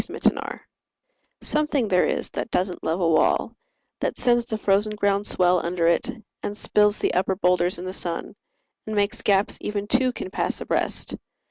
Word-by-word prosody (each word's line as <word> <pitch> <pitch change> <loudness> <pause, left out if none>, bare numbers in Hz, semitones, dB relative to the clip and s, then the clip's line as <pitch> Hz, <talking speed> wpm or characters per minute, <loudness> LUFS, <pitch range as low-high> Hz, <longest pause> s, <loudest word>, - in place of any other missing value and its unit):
Mending - - +2
Wall - - -6 0.8
SOMETHING 300 -5 +1
there 180 -2 +4
is - - -2
that - - -4
doesn't 180 -2 -1
love 165 +3 -1
a 170 - +3
wall, 160 -1 +2 0.4
That - - -2
sends 240 -1 +2
the 220 - -2
frozen 210 +1 +1
ground 200 0 +1
swell 180 -1 +3
under 170 0 -1
it, 170 0 +2 0.3
And 205 - -4
spills 210 0 +3
the - - 0
upper 190 +1 +1
boulders 180 -2 +2
in 180 - -7
the 185 - -4
sun; 170 -3 -4 0.5
And 215 - -3
makes 205 +3 0
gaps 200 -1 +2
even 205 -1 -3
two 255 +4 +2
can 185 - -6
pass - - -2
abreast. - - -1
200 Hz, 175 wpm, -24 LUFS, 180-215 Hz, 0.8 s, there